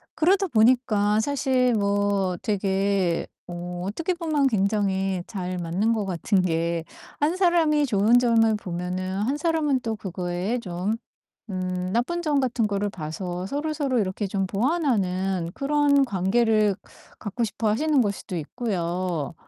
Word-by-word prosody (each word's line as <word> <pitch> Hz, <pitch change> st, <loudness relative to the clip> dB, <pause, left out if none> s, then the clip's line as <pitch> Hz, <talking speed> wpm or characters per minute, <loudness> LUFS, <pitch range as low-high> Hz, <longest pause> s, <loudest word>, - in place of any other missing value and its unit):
그러다 385 Hz, +4 st, +3 dB
보니까 220 Hz, -, +3 dB
사실 260 Hz, -2 st, +1 dB
뭐 200 Hz, -3 st, +1 dB
되게 195 Hz, -3 st, 0 dB, 0.2 s
어 175 Hz, 0 st, -6 dB
어떻게 330 Hz, -, -2 dB
보면 310 Hz, -5 st, +1 dB
굉장히 195 Hz, -4 st, 0 dB
잘 185 Hz, -4 st, -4 dB
맞는 180 Hz, +6 st, 0 dB
것 215 Hz, -3 st, -1 dB
같은 185 Hz, +2 st, +1 dB
게 170 Hz, -1 st, 0 dB, 0.4 s
한 305 Hz, +5 st, +1 dB
사람이 325 Hz, -5 st, +3 dB
좋은 225 Hz, 0 st, +4 dB
점을 225 Hz, -2 st, +3 dB
보면은 185 Hz, 0 st, -4 dB
한 275 Hz, +6 st, 0 dB
사람은 300 Hz, -5 st, +1 dB
또 225 Hz, -2 st, -2 dB
그거에 185 Hz, +4 st, -3 dB
좀 185 Hz, +2 st, -2 dB, 0.6 s
음 185 Hz, 0 st, -3 dB
나쁜 345 Hz, +10 st, 0 dB
점 300 Hz, -4 st, +1 dB
같은 250 Hz, -3 st, 0 dB
거를 205 Hz, 0 st, -1 dB
봐서 175 Hz, +2 st, -5 dB
서로서로 285 Hz, 0 st, -1 dB
이렇게 195 Hz, +1 st, -1 dB
좀 195 Hz, 0 st, -1 dB
보완하는 195 Hz, -, 0 dB
그런 285 Hz, -1 st, +3 dB
관계를 215 Hz, 0 st, +2 dB, 0.4 s
갖고 220 Hz, +3 st, -3 dB
싶어 220 Hz, 0 st, -2 dB
하시는 295 Hz, +6 st, +2 dB
걸 205 Hz, -4 st, +1 dB
수도 180 Hz, -2 st, -6 dB
있고요. 175 Hz, -, -2 dB
205 Hz, 270 characters per minute, -25 LUFS, 185-260 Hz, 0.6 s, 좋은